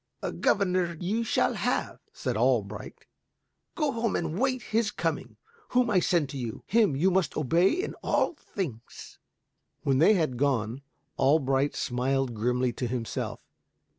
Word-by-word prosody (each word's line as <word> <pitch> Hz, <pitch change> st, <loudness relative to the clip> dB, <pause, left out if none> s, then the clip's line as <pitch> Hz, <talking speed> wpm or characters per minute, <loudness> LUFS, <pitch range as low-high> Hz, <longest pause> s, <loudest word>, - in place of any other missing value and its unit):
"A -, -, -1 dB
governor 180 Hz, -4 st, +1 dB
you 210 Hz, +6 st, -1 dB
shall 225 Hz, -, +1 dB
have." -, -, -1 dB
said -, -, -3 dB
Albrecht. -, -, -1 dB, 0.7 s
"Go 300 Hz, -4 st, +1 dB
home 230 Hz, -3 st, -1 dB
and 165 Hz, -1 st, -2 dB
await 255 Hz, 0 st, 0 dB
his 220 Hz, 0 st, 0 dB
coming. -, -, -3 dB, 0.3 s
Whom 250 Hz, -1 st, +2 dB
I 185 Hz, -, +4 dB
send 170 Hz, -4 st, +2 dB
to 135 Hz, -, -6 dB
you, 120 Hz, +1 st, -5 dB
him 210 Hz, -8 st, +3 dB
you 180 Hz, +8 st, +3 dB
must 180 Hz, -6 st, 0 dB
obey 165 Hz, +6 st, +3 dB
in 370 Hz, +5 st, -2 dB
all -, -, +1 dB
things." 155 Hz, -, -7 dB, 0.6 s
When 135 Hz, -1 st, +2 dB
they 210 Hz, +8 st, +6 dB
had 155 Hz, -9 st, 0 dB
gone, 130 Hz, -2 st, 0 dB, 0.4 s
Albrecht 135 Hz, 0 st, +2 dB
smiled 130 Hz, +1 st, 0 dB
grimly 125 Hz, +3 st, 0 dB
to 125 Hz, -, -3 dB
himself. 120 Hz, -1 st, -4 dB
160 Hz, 145 wpm, -28 LUFS, 130-205 Hz, 0.7 s, they